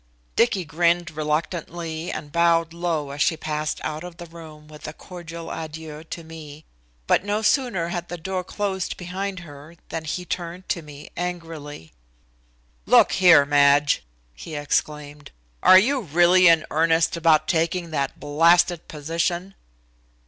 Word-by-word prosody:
Dicky 210 -6 +2
grinned 170 +1 +1
reluctantly 160 +2 -3
and 150 -1 -7
bowed 165 0 +2
low 165 -4 -2
as 140 +1 -5
she 160 +3 +2
passed 155 -1 -3
out 155 +1 -4
of 175 -1 -10
the 175 - -8
room 160 -2 -13
with 150 -1 -11
a 155 - -6
cordial 170 -1 -9
adieu 155 -1 -7
to 165 +1 -8
me, 155 -2 -11 0.4
but - - +2
no 205 +2 -1
sooner 220 - +1
had 175 0 -5
the 175 - -5
door 185 +2 -4
closed 190 -1 -3
behind 185 +1 -5
her 150 0 -13
than 160 -1 -5
he 180 +4 -4
turned 175 +1 -5
to 170 - -1
me 150 -1 -12
angrily. 165 - -6 0.9
"Look - - +6
here, 180 -6 +6
Madge," 145 0 +3 0.3
he - - -9
exclaimed, 145 0 -3 0.3
"are 185 - +8
you 260 +7 +3
really 175 +1 +4
in 165 -2 +5
earnest 165 +1 +2
about 160 -2 +3
taking 170 0 0
that 140 -3 -2
blasted 165 +4 +3
position?" 170 +5 -3
165 Hz, 145 wpm, -23 LUFS, 150-175 Hz, 0.9 s, are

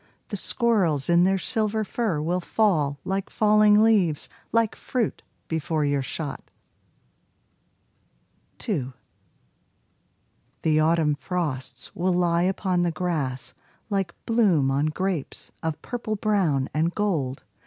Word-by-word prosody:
The 205 - -3
squirrels 185 - +1
in 170 +1 +5
their 195 +1 +3
silver 215 +4 0
fur 210 -5 -1
will 175 +3 0
fall 165 -8 +1
Like 195 0 -2
falling 210 0 +5
leaves, 195 -9 +2 0.2
like 230 -2 +2
fruit, 245 -5 -2 0.3
before 160 -1 -1
your 145 -1 +1
shot. 145 +2 -5 2.2
2 140 - -3 1.7
The 155 -1 +3
autumn 160 -1 +3
frosts 135 -4 -4
will 180 +1 +1
lie 175 -1 +2
upon 185 0 +1
the 175 - +2
grass 155 -7 -2 0.4
Like 195 -3 -1
bloom 190 - +3
on 140 +3 +1
grapes 175 -1 -3
of 160 -2 -3
purple 230 -3 -3
brown 190 -11 +1
and 160 +3 0
gold. 155 -11 -1
175 Hz, 115 wpm, -25 LUFS, 150-210 Hz, 2.2 s, in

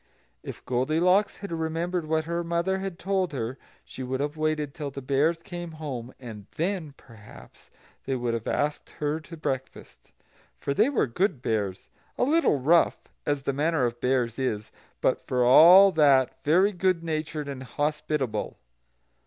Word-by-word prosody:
If - - -9
Goldilocks 165 +11 +2
had 200 -2 -8
remembered 165 +1 -2
what 160 0 0
her 170 +1 -2
mother 170 +3 -1
had 190 -3 -5
told 190 -3 -1
her, 125 0 -4 0.3
she - - -9
would 130 +1 -3
have 145 +2 -2
waited 155 -2 -1
till 150 -4 -5
the 140 - -7
Bears 140 +5 +1
came 175 -4 -7
home, 135 -6 -6
and 110 -6 -10
then, 165 -4 -2
perhaps, 110 -4 -16 0.4
they 135 - -1
would 120 -2 -2
have 115 -1 -4
asked 150 +1 -1
her 150 +1 -1
to 165 +1 -11
breakfast; 135 -4 -6 0.5
for 140 - -2
they 215 - +3
were 280 - +1
good 140 - -1
Bears 100 -4 -2 0.3
a - - +1
little 305 - +3
rough, 165 +6 +3 0.3
as 145 -2 0
the 140 - -1
manner 150 -1 +1
of 120 0 -4
Bears 125 -2 0
is, 110 -5 -2 0.3
but - - 0
for 125 -1 +1
all 180 +10 +8
that 135 -5 +3
very 185 +7 +4
good 185 -2 0
natured 155 -2 -3
and 135 -2 -6
hospitable. 145 -3 -2
150 Hz, 160 wpm, -26 LUFS, 130-170 Hz, 0.5 s, all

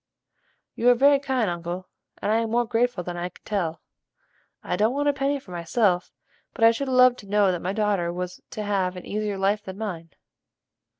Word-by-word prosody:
"You 240 - +3
are 245 - +6
very 280 +3 +5
kind, 265 -5 0
uncle; 175 +1 -4 0.4
and 210 - +1
I 220 - +3
am 230 0 0
more 240 +2 +2
grateful 235 -4 0
than 175 0 -5
I 175 +1 -3
can - - -21
tell. 170 -6 -2 0.8
I - - -1
don't 215 +7 +1
want 290 +1 0
a 290 - +4
penny 275 +1 0
for 205 - -15
myself, 180 +2 0 0.4
but 230 - -2
I 225 - +8
should 265 +4 -3
love 255 -1 +6
to 205 - -12
know 205 -2 +4
that 175 -2 -3
my 185 - -2
daughter 200 -5 0
was 180 +1 -5
to 215 - -5
have 190 -3 0
an 180 - -8
easier 210 -1 -2
life 200 +2 +1
than 190 0 -8
mine." 180 -7 -5
205 Hz, 205 wpm, -25 LUFS, 180-240 Hz, 0.8 s, I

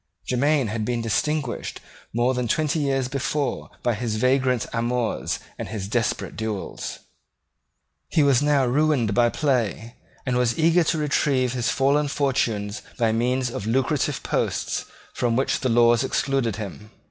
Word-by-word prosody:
Jermyn 140 -1 +2
had 110 +1 -2
been 120 +1 -1
distinguished 135 +4 -1 0.3
more 120 +3 +2
than 125 -1 -1
twenty 155 +4 +1
years 135 -3 0
before 140 +1 -2
by 120 - +2
his 110 0 -2
vagrant 125 +1 +2
amours 120 0 -1 0.2
and - - -4
his 100 -1 -5
desperate 115 +1 -1
duels. 110 -3 -4 1.1
He 155 - +3
was 140 -3 +4
now 145 -2 +3
ruined 130 -4 +2
by 120 +2 +4
play, 120 -5 -1 0.3
and 125 -2 0
was 125 -2 +1
eager 165 +2 +4
to 165 - +1
retrieve 140 -4 +1
his 120 -2 0
fallen 140 +2 +2
fortunes 115 -8 -1 0.2
by 115 -3 +2
means 125 +2 0
of 105 -2 -5
lucrative 130 +3 0
posts - - -1 0.3
from 120 -2 0
which 135 +3 +1
the 130 - 0
laws 120 +1 +4
excluded 130 -4 0
him. 105 0 -7
125 Hz, 145 wpm, -24 LUFS, 115-140 Hz, 1.1 s, was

